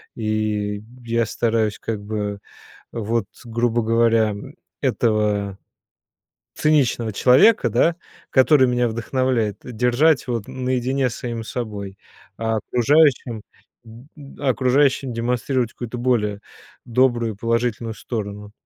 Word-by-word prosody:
и 105 -2 -2 0.2
я 115 0 +1
стараюсь 110 -2 0
как 110 -3 -4
бы 105 -1 -3 0.5
вот, 115 -1 -1 0.2
грубо 120 0 0
говоря, 115 -1 +3
м, 100 0 -8 0.2
этого 105 -3 0 1.0
циничного 130 -7 +1
человека, 130 - +5
да, 125 +9 +2 0.3
который 130 0 +5
меня 125 -1 +1
вдохновляет, 115 -1 -1
держать 125 +5 +2
вот 115 -5 -3
наедине 130 +1 -1
с 115 - -7
самим 115 -2 -5
собой, 105 -5 -6 0.4
а 110 0 0
окружающим 125 -3 +3 0.4
д 115 +3 -14
д 145 -1 -13
а 140 - +1
окружающим 135 +1 +2
демонстрировать 120 +1 -1
какую-то 120 0 -6
более 110 -5 0 0.5
добрую 120 -2 +2
и - - -18
положительную 115 0 -1
сторону. 105 -3 -6
115 Hz, 115 wpm, -21 LUFS, 110-125 Hz, 1.0 s, человека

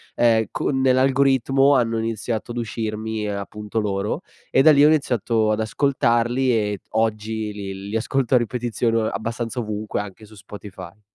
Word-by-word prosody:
ehm, 115 -2 +3
con 135 -2 -1
nell'algoritmo 135 +1 +3
hanno 115 -3 +1
iniziato 115 +1 -3
ad 120 - -6
uscirmi, 110 -1 -3
ehm, 100 -1 -3
appunto 105 +2 -5
loro, 100 -1 -2 0.3
e 135 - +4
da 155 - +8
lì 145 -1 +5
ho 150 - +8
iniziato 115 -7 +1
ad 110 - 0
ascoltarli 120 +1 +1 0.2
ed 100 - -4
oggi 110 -1 -1
li 100 -1 -7
li 105 - -4
ascolto 130 +3 0
a - - +8
ripetizione 120 -1 -1
o 110 - +1
abbastanza 115 +2 -4
ovunque, 105 -2 -3
anche 105 +1 -10
su 110 - -17
Spotify. 100 -1 -11
115 Hz, 160 wpm, -22 LUFS, 105-125 Hz, 0.3 s, da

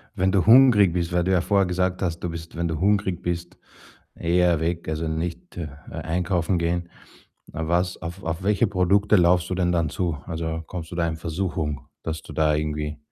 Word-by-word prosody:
Wenn 95 -1 +2
du 95 -3 +2
hungrig 110 -6 +7
bist 85 -1 -1
weil 90 0 +2
du 95 - 0
ja 90 -2 +3
vorher 100 +1 +2
gesagt 90 0 -1
hast, 85 -2 -1
du 90 - -3
bist, 85 0 -8
wenn 85 +1 -1
du 80 -2 -3
hungrig 100 -2 +1
bist, 85 0 -4 0.6
eher 85 -1 +2
weg, 85 +1 -2
also, 80 +1 -2
nicht 85 +3 -4 0.3
einkaufen 90 +2 -1
gehen. 85 +1 -1 0.6
Was 85 +3 -1
auf 85 +4 -7
auf 80 +1 -3
welche 105 0 +3
Produkte 100 +2 +3
läufst 90 0 +3
du - - 0
denn 90 -1 +1
dann 85 -3 +1
zu? 85 0 -2
Also, 80 -1 -4
kommst 85 -1 -7
du - - -6
da 85 -1 +1
in 80 -1 -3
Versuchung, 80 -3 -3
dass 80 0 -5
du - - -10
da 75 -1 +2
irgendwie 75 0 -3
85 Hz, 190 wpm, -24 LUFS, 80-90 Hz, 0.6 s, hungrig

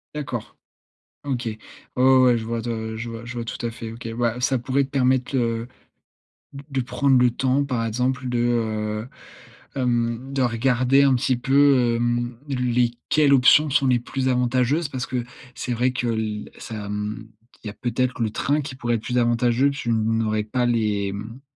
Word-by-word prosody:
D'accord. 130 -7 -5 0.7
OK. 130 -4 -3
Ouais, 110 -1 -4 0.4
ouais, 130 +1 +5
ouais, 125 -2 +4
je 110 - -6
vois 115 +1 -2
de 110 -1 -4
je 115 +1 -5
vois 115 0 -8
je 120 +1 -7
vois 120 -1 -4
tout 115 - -6
à - - -2
fait, 115 0 -7
OK. 115 0 -8
Ouais, 120 0 0
ça 130 +1 +2
pouvait 135 +3 +1
te 135 - -12
permettre, 130 -1 +1
heu, 115 -2 0 0.9
d 140 0 -10
de 135 -2 -1
prendre 135 +2 +2
le 125 -1 +4
temps, 130 +3 +1
par 125 -5 -2
exemple, 125 +3 -1
de 125 -1 -1
heu, 110 -2 -1 0.7
hem, 120 0 -1
de 135 - +1
regarder 125 +3 +3
un 135 -1 +4
petit 125 +1 +1
peu, 135 -2 +4
hem, 120 0 -1
les 125 -3 +1 0.2
quelles 150 -2 +4
options 140 +3 +6
sont 135 0 +2
les 125 -2 +3
plus 130 +2 -3
avantageuses 130 +5 +1
parce 130 -2 -4
que, 125 -2 -3 0.3
c'est 125 - -4
vrai 125 +2 +1
que 125 -1 -2
l 110 -2 -3
ça 115 - -8
hem, 105 +2 -4 0.4
il - - -4
y - - -3
a - - -9
peut-être 125 +2 -2
le 115 - +1
train 145 +7 0
qui 140 -2 -6
pourrait 120 -2 0
être 110 - -6
plus 125 - -3
avantageux, 120 +3 +2
tu 140 -3 -5
n 115 - +3 0.2
n'aurais 110 -1 0
pas 120 +3 -1
les, 105 -4 0
hem 110 +5 -7
120 Hz, 195 wpm, -23 LUFS, 115-130 Hz, 0.9 s, options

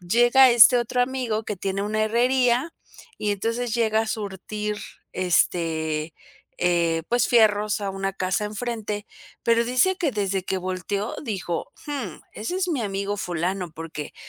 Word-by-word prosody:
llega 240 +8 +5
este 240 +1 +8
otro 240 +1 -1
amigo 245 -4 -2
que 210 - -4
tiene 195 +2 -2
una 215 +1 0
herrería, 250 +5 +2 0.5
y 210 -1 0
entonces 230 +3 -2
llega 220 -2 +2
a 225 - -2
surtir, 210 0 -4 0.4
este, 165 -3 0 0.4
eh, 170 -2 +1
pues 240 0 +2
fierros 215 -3 +3
a 200 - -1
una 195 0 -3
casa 185 +2 -1
enfrente, 215 -1 -4 0.4
pero 230 0 +3
dice 255 +11 +2
que 315 -5 +1
desde 195 -3 -1
que 190 - -2
volteó 185 +3 -3
dijo: 190 - -3
"Jum, 265 - -5
ese 230 +13 -4
es 370 -1 0
mi 295 -7 0
amigo 200 0 -2
fulano", 180 0 -2
porque 160 -2 -7
210 Hz, 145 wpm, -24 LUFS, 185-240 Hz, 0.5 s, este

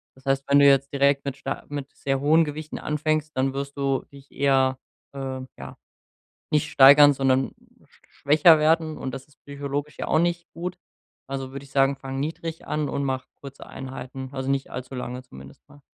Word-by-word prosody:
Das 130 +1 -21
heißt, 135 0 +1
wenn 140 0 +5
du 140 - +6
jetzt 140 0 +4
direkt 140 0 +2
mit 140 -1 -3
star 135 0 -5
mit 145 -1 -6
sehr 135 -1 -1
hohen 155 +4 +4
Gewichten 155 +1 -6
anfängst, 155 0 -1
dann 130 +1 0
wirst 140 +1 -5
du 135 -1 0
dich 140 0 -15
eher, 135 -1 +2 0.4
äh, 135 -1 -5 0.2
ja, - - -10 0.7
nicht 150 -1 +1
steigern, 145 +2 +8
sondern 135 -1 +1 0.3
schwächer 155 +3 +3
werden, 155 0 +2
und 130 - -5
das 135 -1 -8
ist 145 - -26
psychologisch 140 +1 -5
ja - - -3
auch - - +3
nicht 170 0 -1
gut. 180 +1 -5 0.5
Also, 135 -1 -4
würd 140 0 -7
ich 140 - -15
sagen, 135 0 +3
fang 135 0 -6
niedrig 160 +2 -5
an 150 -1 -1
und 140 +1 -2
mach 130 -1 -2
kurze 140 0 -12
Einheiten, 130 0 -8
also 130 -1 -3
nicht 135 0 -1
allzu 125 +1 -7
lange 125 0 -5
zumindest, 70 - -14
ne? 145 - -18
140 Hz, 190 wpm, -24 LUFS, 135-145 Hz, 0.7 s, steigern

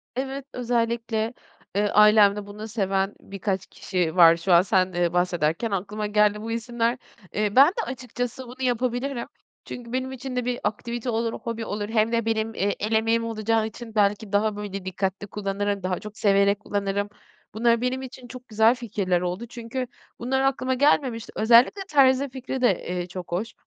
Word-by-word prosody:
Evet, 270 +1 -4
özellikle, 230 -2 -1 0.4
eee, 205 +1 +2
ailemde 210 -1 +5
bunu 210 +2 -8
seven 195 -2 -1
birkaç 195 -1 -3
kişi 180 -4 -2
var. 170 -2 +7
Şu 175 +2 +1
an 170 - +8
sen, 185 -1 +1
eee, 175 -1 0
bahsederken 175 +3 0
aklıma 205 +2 -2
geldi 210 0 +2
bu 225 +1 -5
isimler. 235 +1 -1 0.4
Eee, 210 0 -1
ben 270 +2 +9
de 410 +6 -3
açıkçası 245 0 -5
bunu 255 +2 -11
yapabilirim. 245 +1 -1 0.4
Çünkü 240 -1 -8
benim 260 +1 -2
için 265 0 -6
de 250 -1 -1
bir 245 0 -1
aktivite 235 +3 -3
olur, 230 0 -1
hobi 230 -1 -5
olur, 205 0 -4
hem 220 0 +2
de 230 -1 0
benim, 225 0 -1
eee, 200 -1 0
el 215 - -2
emeğim 225 +1 +2
olacağı 225 0 0
için 225 0 -10
belki 205 0 +1
daha, 210 +1 +1
böyle, 200 -2 -6
dikkatli 190 +1 -3
kullanırım, 200 0 -2
daha 185 -1 -1
çok 210 0 -10
severek 200 0 +3
kullanırım. 200 -1 -2 0.4
Bunlar 235 +1 +2
benim 255 +1 -1
için 255 -1 -10
çok 255 +1 -11
güzel 220 +2 +4
fikirler 200 -7 -1
oldu 180 +5 -3
çünkü 245 +2 -5 0.3
bunlar 265 +3 0
aklıma 260 -1 +1
gelmemişti. 255 -4 +1
Özellikle 235 - +5
terzi 270 -1 +4
fikri 260 0 -5
de, 220 -8 +2
eee, 180 0 -3
çok 180 -1 -8
hoş. 195 +7 -2
220 Hz, 170 wpm, -25 LUFS, 200-245 Hz, 0.4 s, ben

